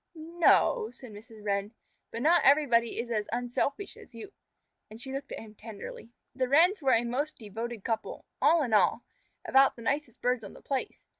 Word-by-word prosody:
"N 330 Hz, +2 st, -11 dB
no," 440 Hz, +5 st, +4 dB
said 250 Hz, -4 st, -12 dB
Mrs. 215 Hz, 0 st, -13 dB
Wren, 200 Hz, +1 st, -1 dB, 0.4 s
"but 230 Hz, -, -5 dB
not 340 Hz, +3 st, +5 dB
everybody 245 Hz, -5 st, +3 dB
is 235 Hz, +1 st, -4 dB
as 215 Hz, -2 st, -2 dB
unselfish 245 Hz, -, -2 dB
as -, -, -16 dB
you." 405 Hz, -1 st, -10 dB, 0.6 s
And 220 Hz, +1 st, -12 dB
she 265 Hz, +2 st, -7 dB
looked 275 Hz, +1 st, -6 dB
at -, -, -5 dB
him 215 Hz, -1 st, -11 dB
tenderly. 220 Hz, +1 st, -10 dB, 0.2 s
The 255 Hz, -1 st, -1 dB
Wrens 340 Hz, +7 st, +4 dB
were 265 Hz, -2 st, +3 dB
a 230 Hz, -, +3 dB
most 275 Hz, +6 st, -2 dB
devoted 225 Hz, 0 st, -6 dB
couple, 225 Hz, -1 st, -4 dB, 0.2 s
all 330 Hz, -2 st, +4 dB
in 240 Hz, -5 st, -3 dB
all, 210 Hz, +3 st, +3 dB, 0.4 s
about 270 Hz, 0 st, +4 dB
the 235 Hz, -, -11 dB
nicest 280 Hz, -1 st, -2 dB
birds 250 Hz, -2 st, 0 dB
on 200 Hz, -, -9 dB
the -, -, -14 dB
place. 270 Hz, -2 st, -4 dB
245 Hz, 195 wpm, -29 LUFS, 225-285 Hz, 0.6 s, not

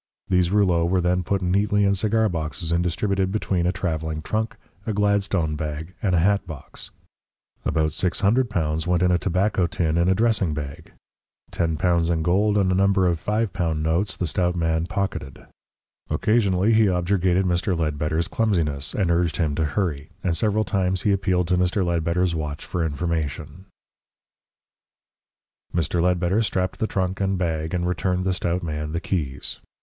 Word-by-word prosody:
These 90 Hz, -2 st, +3 dB
rouleaux 95 Hz, -4 st, +3 dB
were 90 Hz, +2 st, +2 dB
then 90 Hz, +1 st, +1 dB
put 95 Hz, +3 st, -1 dB
neatly 100 Hz, +3 st, +2 dB
in 100 Hz, -, +3 dB
cigar 110 Hz, +3 st, +1 dB
boxes 85 Hz, -1 st, -3 dB
and 85 Hz, +1 st, +2 dB
distributed 95 Hz, +2 st, 0 dB
between 95 Hz, -4 st, 0 dB
a -, -, +2 dB
travelling 80 Hz, -4 st, -3 dB
trunk, 110 Hz, +5 st, -2 dB, 0.3 s
a 110 Hz, -, 0 dB
Gladstone 100 Hz, -6 st, +1 dB
bag, 75 Hz, +3 st, -5 dB
and 95 Hz, -3 st, +1 dB
a -, -, +4 dB
hatbox. 90 Hz, -5 st, -2 dB, 0.8 s
About 80 Hz, -1 st, +1 dB
L600 90 Hz, -, 0 dB
went 90 Hz, 0 st, +2 dB
in 90 Hz, -, +3 dB
a 90 Hz, -, +3 dB
tobacco 95 Hz, 0 st, +1 dB
tin 85 Hz, -1 st, 0 dB
in 85 Hz, +2 st, +3 dB
a 95 Hz, -, +4 dB
dressing 105 Hz, -7 st, +1 dB
bag. 70 Hz, -2 st, -7 dB, 0.6 s
L10 85 Hz, 0 st, +1 dB
in 80 Hz, -2 st, 0 dB
gold 100 Hz, +5 st, +2 dB
and 95 Hz, -2 st, +2 dB
a -, -, +2 dB
number 95 Hz, 0 st, +3 dB
of 85 Hz, -2 st, 0 dB
L5 95 Hz, -7 st, 0 dB
notes 80 Hz, +6 st, 0 dB
the 90 Hz, -, -1 dB
stout 90 Hz, +2 st, 0 dB
man 80 Hz, -1 st, 0 dB
pocketed. 95 Hz, -8 st, -4 dB, 0.6 s
Occasionally 105 Hz, -2 st, +2 dB
he 110 Hz, 0 st, +5 dB
objurgated 90 Hz, 0 st, +1 dB
Mr. 90 Hz, +1 st, 0 dB
Ledbetter's 80 Hz, +1 st, -1 dB
clumsiness, 80 Hz, -11 st, 0 dB
and 95 Hz, -5 st, +1 dB
urged 85 Hz, -1 st, +1 dB
him 80 Hz, -4 st, 0 dB
to 80 Hz, +2 st, 0 dB
hurry, 75 Hz, -2 st, -2 dB
and 85 Hz, -3 st, +1 dB
several 110 Hz, +3 st, +1 dB
times 95 Hz, -3 st, 0 dB
he 105 Hz, -, +3 dB
appealed 95 Hz, -3 st, +1 dB
to 90 Hz, 0 st, +2 dB
Mr. 90 Hz, +1 st, +1 dB
Ledbetter's 85 Hz, +1 st, 0 dB
watch 75 Hz, -2 st, -4 dB
for 90 Hz, -, -2 dB
information. 80 Hz, +1 st, -3 dB, 2.1 s
Mr. 85 Hz, 0 st, 0 dB
Ledbetter 90 Hz, +3 st, +2 dB
strapped 95 Hz, -4 st, -1 dB
the 110 Hz, -, 0 dB
trunk 95 Hz, -1 st, -2 dB
and 95 Hz, 0 st, +1 dB
bag, 80 Hz, -1 st, -2 dB
and 90 Hz, 0 st, -1 dB
returned 90 Hz, 0 st, -1 dB
the 95 Hz, -, +1 dB
stout 90 Hz, -2 st, -1 dB
man 75 Hz, -1 st, -4 dB
the 85 Hz, -, -1 dB
keys. 75 Hz, -8 st, -3 dB
90 Hz, 165 wpm, -23 LUFS, 80-95 Hz, 2.1 s, he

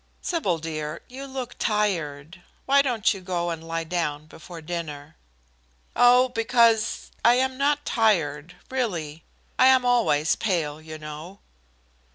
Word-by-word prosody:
Sybil, 260 Hz, -, -1 dB
dear, 155 Hz, -1 st, -5 dB
you 270 Hz, +2 st, -8 dB
look 260 Hz, -2 st, -6 dB
tired. 175 Hz, -6 st, -1 dB, 0.2 s
Why 280 Hz, +1 st, +5 dB
don't 235 Hz, -5 st, +1 dB
you 195 Hz, -, -9 dB
go 175 Hz, -2 st, -2 dB
and 165 Hz, -1 st, -6 dB
lie 165 Hz, 0 st, -3 dB
down 160 Hz, -3 st, -3 dB
before 165 Hz, +2 st, -11 dB
dinner?" 155 Hz, -2 st, -6 dB, 0.8 s
"Oh, 250 Hz, +1 st, +5 dB
because 230 Hz, -2 st, +2 dB
I 235 Hz, +1 st, +6 dB
am 260 Hz, +1 st, +1 dB
not 290 Hz, +2 st, 0 dB
tired, 175 Hz, -7 st, +1 dB, 0.2 s
really. 170 Hz, -, -3 dB, 0.4 s
I 260 Hz, -, +7 dB
am 260 Hz, -1 st, +5 dB
always 220 Hz, -12 st, +2 dB
pale, 160 Hz, -7 st, -2 dB
you 155 Hz, 0 st, -9 dB
know." 155 Hz, +5 st, -9 dB
180 Hz, 135 wpm, -25 LUFS, 155-245 Hz, 0.8 s, I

